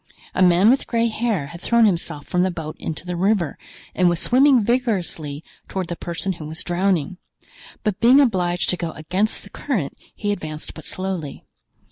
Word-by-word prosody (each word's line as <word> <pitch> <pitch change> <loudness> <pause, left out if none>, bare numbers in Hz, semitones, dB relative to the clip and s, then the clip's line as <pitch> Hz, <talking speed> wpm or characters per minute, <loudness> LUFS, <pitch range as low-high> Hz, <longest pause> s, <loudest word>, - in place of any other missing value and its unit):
A - - 0
man 185 +4 +6
with 270 - +1
gray 230 -1 +1
hair 215 -8 -1
had 170 +4 -10
thrown 235 -1 +4
himself 170 -6 -1
from 180 - 0
the 185 - +2
boat 160 -3 -6
into 160 +2 -5
the 180 0 -3
river 185 -2 +1 0.4
and 180 -1 +3
was 175 -2 0
swimming 260 -1 +5
vigorously 190 - -1 0.2
toward 185 -3 -4
the 175 - -3
person 175 +3 -2
who 160 -3 -9
was 160 +1 -3
drowning; 180 -1 0 0.7
but 210 -3 -1
being 250 +4 +6
obliged 180 -9 +2
to 180 - +2
go 170 -2 -4
against 185 +7 -1
the 200 - -14
current 205 - -2 0.2
he 205 -1 -2
advanced 155 -6 -5
but 160 - -10
slowly. 185 -6 -4
185 Hz, 180 wpm, -22 LUFS, 170-215 Hz, 0.7 s, man